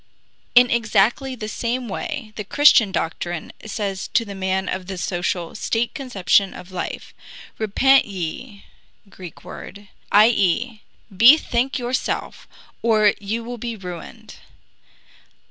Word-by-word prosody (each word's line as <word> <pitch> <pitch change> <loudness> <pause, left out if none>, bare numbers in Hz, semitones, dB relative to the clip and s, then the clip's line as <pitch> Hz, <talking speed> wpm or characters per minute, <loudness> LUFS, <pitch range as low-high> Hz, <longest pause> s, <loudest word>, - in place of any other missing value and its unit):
In 245 0 +7
exactly 235 +3 +1
the 215 -3 -6
same 240 +3 -3
way 230 - -5
the 210 - -5
Christian 230 -3 +5
doctrine 175 -1 -3 0.2
says 200 -3 -3
to 230 - +3
the 200 - -7
man 190 0 -2
of 185 -1 -4
the 190 -1 -5
social, 175 -1 -2
state 225 +1 -1
conception 200 -6 +1
of 180 +1 -11
life, 185 - -6 0.5
Repent 265 +6 +4
ye 200 +4 -6 0.4
[GREEK 185 -3 -12
WORD] 200 +1 -11 0.2
i. 215 +2 +7
e., 220 +2 0 0.3
bethink 245 +3 +5
yourself, 250 0 -3 0.3
or 215 -3 +4
you 215 +3 -3
will 240 +1 -7
be 235 0 -4
ruined. 180 -4 -10
215 Hz, 125 wpm, -21 LUFS, 190-240 Hz, 0.5 s, In